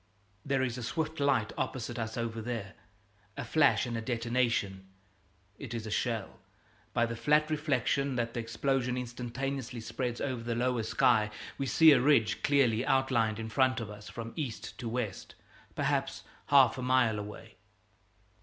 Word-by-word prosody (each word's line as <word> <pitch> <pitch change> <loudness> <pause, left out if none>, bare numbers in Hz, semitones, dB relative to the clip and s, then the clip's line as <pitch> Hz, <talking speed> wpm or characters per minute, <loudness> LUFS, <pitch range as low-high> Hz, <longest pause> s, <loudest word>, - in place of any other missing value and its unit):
There 135 -2 +1
is 125 -1 -2
a - - -5
swift 160 +6 -3
light 140 -6 +1
opposite 120 -2 -3
us 110 0 -4
over 115 -1 -3
there; 110 -4 -4 0.6
a - - -4
flash 150 -4 +3
and 120 -1 -4
a 115 - -2
detonation. 115 -5 -1 0.7
It 125 -4 -6
is 115 -1 -4
a 110 - -5
shell! 115 -2 -2 0.5
By 120 - +2
the 115 0 -4
flat 150 +5 +2
reflection 140 -2 0
that 115 -1 -1
the - - -3
explosion 125 +2 -1
instantaneously 125 +1 -4
spreads 120 +2 -3
over 130 -4 -2
the 115 0 -2
lower 125 0 +1
sky 105 -1 +3 0.3
we 135 - -1
see 160 +4 +7
a 130 -4 +5
ridge 130 -5 +3
clearly 130 -5 +3
outlined 130 -5 +2
in 110 0 -5
front 130 +2 +2
of 110 -3 -6
us 105 0 -10
from 115 -1 -7
east 135 -8 -5
to 120 -2 -4
west, 115 -5 -4 0.4
perhaps - - -1 0.2
half 130 -3 +5
a - - -3
mile 125 -4 +2
away. 105 0 -9
120 Hz, 165 wpm, -31 LUFS, 115-135 Hz, 0.7 s, see